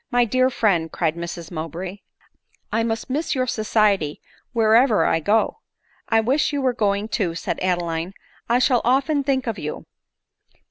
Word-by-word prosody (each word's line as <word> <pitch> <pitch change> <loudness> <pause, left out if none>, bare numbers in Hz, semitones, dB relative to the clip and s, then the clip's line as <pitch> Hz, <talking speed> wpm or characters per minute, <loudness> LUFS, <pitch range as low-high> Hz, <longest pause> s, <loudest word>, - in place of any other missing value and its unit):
" - - -49
My 240 - +5
dear 255 +3 +2
friend," 180 -10 +1
cried 160 -2 -1
Mrs 170 0 -6
Mowbray, 175 +4 -5 0.4
" - - -42
I 225 - +2
must 225 0 -2
miss 290 +4 -1
your 255 -1 +1
society 210 -9 +1 0.3
wherever 230 0 +4
I 165 - +2
go." 210 - +1 0.3
" - - -36
I 225 -1 +4
wish 265 +8 +1
you 285 - -1
were 260 -2 +1
going 205 -2 0
too," 195 -6 -1
said - - -3
Adeline; 175 0 -2 0.2
" - - -32
I 240 - +4
shall 250 -1 +3
often 275 +4 +2
think 265 -2 0
of 225 -5 -3
you." 150 -1 -5
215 Hz, 180 wpm, -22 LUFS, 175-250 Hz, 0.4 s, My